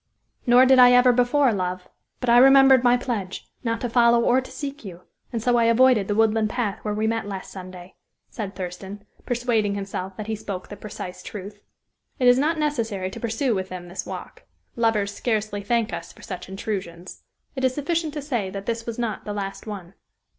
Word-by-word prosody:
"Nor 245 +2 +7
did 260 0 +6
I 250 0 +8
ever 250 0 +6
before, 250 +1 +3
love; 185 -1 -3 0.3
but 250 - -3
I 240 - +7
remembered 270 -1 +7
my 245 0 +5
pledge, 220 -7 -4 0.2
not 230 -1 -1
to 245 - -1
follow 235 0 +4
or 250 +2 +3
to 260 - -12
seek 275 +2 -6
you, 180 -4 -9 0.3
and 230 -3 -3
so 245 0 +3
I 235 - +3
avoided 230 -3 +4
the 205 - -1
woodland 220 0 +2
path 215 -4 -2
where 210 -1 -3
we 215 +1 0
met 225 -1 -1
last 195 -2 -6
Sunday," 185 -1 -10 0.3
said 205 -3 -6
Thurston, 190 +2 -7 0.2
persuading 235 -4 0
himself 195 -1 -5
that 215 - -5
he 220 0 -2
spoke 195 -3 -6
the 205 - -7
precise 185 -3 -8
truth. 205 +1 -9 0.6
It 250 - +2
is 245 +1 +6
not 315 +4 +1
necessary 230 -11 -2
to - - -8
pursue 235 +2 0
with 190 -2 -3
them 180 -1 -8
this 180 - -5
walk; - - -8 0.3
lovers 220 -4 +1
scarcely 215 -3 -2
thank 230 +2 0
us - - -6
for - - -17
such - - -7
intrusions. 190 -3 -6 0.3
It 265 - -4
is 260 -1 +2
sufficient 315 +1 -1
to 295 - -4
say 240 -9 -2
that 195 +1 -7
this 230 0 -3
was 230 - -4
not 230 -4 -3
the 210 - -4
last 200 +1 -5
one. 195 -4 -7
225 Hz, 205 wpm, -24 LUFS, 195-245 Hz, 0.6 s, I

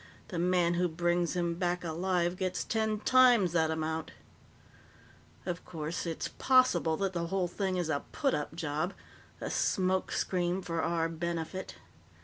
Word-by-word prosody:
The 175 - -3
man 175 -1 +3
who 180 +1 +2
brings 175 +1 0
him 170 -1 0
back 175 +1 -1
alive 175 +1 0
gets 185 0 -2
ten 220 -1 -1
times 245 -7 +5
that 160 -2 +2
amount. 160 0 -2 1.4
"Of 175 -1 -3
course, 160 +1 -4
it's 165 - -2
possible 255 -12 +4
that 195 -1 -1
the 170 -1 -2
whole 190 0 0
thing 185 +1 -2
is 175 -2 0
a 145 -3 0
put 275 -3 +1
up 150 +2 -3
job 155 +3 -2 0.4
a - - -4
smoke 185 -2 +1
screen 180 0 0
for 165 -2 -2
our 165 -1 +1
benefit. 170 +2 -4
175 Hz, 150 wpm, -31 LUFS, 165-185 Hz, 1.4 s, times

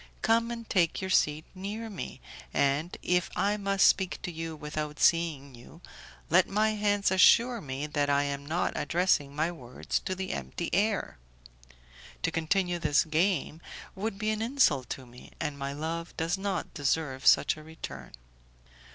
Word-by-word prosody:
Come 230 0 +3
and 230 -1 -6
take 170 -4 +2
your 190 -1 -3
seat 155 -2 +2
near 205 +4 -5
me, 200 - -7 0.3
and 140 +5 +1
if 180 -1 +1
I 200 +3 +1
must 195 -1 +2
speak 190 -1 +3
to 175 - -3
you 165 -1 -5
without 150 0 -5
seeing 155 -5 +2
you 120 0 -14 0.5
let - - +4
my 215 +2 +2
hands 205 -2 +1
assure 230 +5 +5
me 135 +1 -4
that 145 -1 -1
I 140 0 +3
am 140 0 -3
not 160 +5 -1
addressing 165 -5 +1
my 155 +3 0
words 125 -7 -4
to 185 - -4
the 190 0 -4
empty 170 - -5
air. 205 - 0 1.0
To - - +1
continue 175 +2 0
this 150 -2 +3
game 160 0 0 0.3
would 200 +1 -4
be 215 +1 0
an 215 0 -2
insult 225 - +2
to 130 - -5
me, 125 0 -15
and 150 - -2
my 140 0 -3
love 165 +4 -5
does 165 +3 0
not 195 0 -3
deserve 140 -3 -1
such - - +5
a 155 - -11
return." 160 +1 -9
170 Hz, 165 wpm, -29 LUFS, 150-195 Hz, 1.0 s, assure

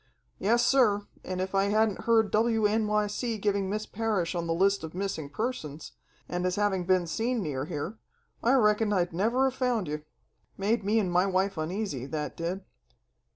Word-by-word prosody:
"Yessir, 235 -1 +3 0.2
and 185 0 -4
if 185 +1 -3
I 195 0 +3
hadn't 215 0 +1
heard 225 -2 +3
WNYC 215 0 +1
giving 200 -1 0
Miss 215 +2 -2
Parrish 210 -6 -1
on 170 -1 -2
the 165 - +1
list 195 +2 +2
of 160 +1 -7
missing 185 -6 -3
persons, 160 - -4 0.4
and 180 0 -2
as 180 0 0
having 200 -3 0
been 185 -1 +3
seen 230 +6 -1
near 140 -4 -3
here, 165 +7 -5 0.4
I 240 - +3
reckon 210 -3 +3
I'd 180 -4 +1
never 225 +9 +2
have 265 - -2
found 245 - +1
you. 150 +1 -3 0.6
Made 210 +3 +1
me 210 +3 +2
and 195 -5 +1
my 180 +2 +3
wife 195 +1 +1
uneasy, 160 - -3
that 150 0 -4
did. 180 +3 -4
200 Hz, 170 wpm, -28 LUFS, 180-220 Hz, 0.6 s, Yessir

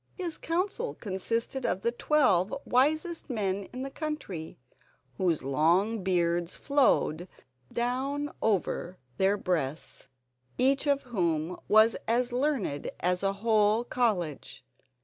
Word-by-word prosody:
His 350 -4 -4
council 385 +8 -2
consisted 230 +6 -3
of 190 -5 -1
the 235 - +2
twelve 235 - +2
wisest 310 +6 +1
men 200 -4 -1
in 255 +5 -7
the 275 - -5
country, 275 - -5 0.6
whose 175 -6 +1
long 170 +11 +2
beards 175 -1 0
flowed 255 - +2 0.4
down 270 +5 -1
over 185 -3 0 0.2
their 195 +2 +3
breasts, 160 -9 -3 0.5
each 275 +3 +3
of 280 -1 +2
whom 175 - -1
was 215 +1 +6
as 240 +2 +1
learned 245 - -1
as 180 0 +1
a 195 0 +1
whole 215 +1 +2
college. 195 - -2
215 Hz, 115 wpm, -29 LUFS, 180-265 Hz, 0.6 s, was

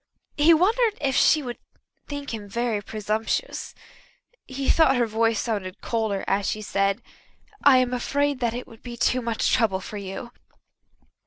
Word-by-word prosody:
He 300 +3 +6
wondered 425 +7 +3
if 270 -2 0
she 305 -2 +4
would 245 -2 -6 0.5
think 285 -3 -5
him 205 -2 -6
very 230 -1 -1
presumptuous. 215 - -3 0.7
He 270 +1 -4
thought 315 -5 +5
her 245 -1 +2
voice 225 0 +1
sounded 200 -5 -3
colder 220 -4 -1
as 195 0 0
she 215 - -3
said: 195 +2 0 0.6
"I 275 -2 +7
am 255 -1 +2
afraid 285 +2 0
that 235 -2 0
it 250 - -5
would 225 - -16
be 240 -1 -8
too 255 +2 +2
much 230 -2 0
trouble 205 -5 +2
for 210 +2 -7
you." 200 +4 -7
235 Hz, 160 wpm, -25 LUFS, 210-270 Hz, 0.7 s, I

